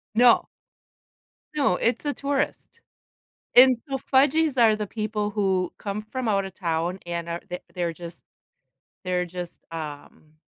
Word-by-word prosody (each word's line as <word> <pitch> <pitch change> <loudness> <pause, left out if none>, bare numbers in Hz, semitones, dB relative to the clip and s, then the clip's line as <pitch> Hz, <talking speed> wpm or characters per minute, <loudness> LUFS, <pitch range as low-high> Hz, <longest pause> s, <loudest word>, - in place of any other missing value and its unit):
No. 240 0 +5 1.1
No, 275 -11 +2
it's 235 +9 0
a 290 - 0
tourist. 285 +12 -3 0.7
And 255 0 +8
so, 270 -1 -2
"fudgies" 280 +2 +2
are 220 -2 +6
the 210 -1 -3
people 215 0 -2
who 190 -3 0
come 205 +1 -4
from 240 +2 -4
out 195 -2 +2
of 190 -1 -8
town 170 0 -1
and 170 -1 -4
are 170 +1 -3
the 180 0 -5
they're 175 -2 -1
just 170 +1 -10 0.8
they're 180 -1 0
just, 175 0 -8
um 155 -1 -8
200 Hz, 145 wpm, -25 LUFS, 175-250 Hz, 1.1 s, And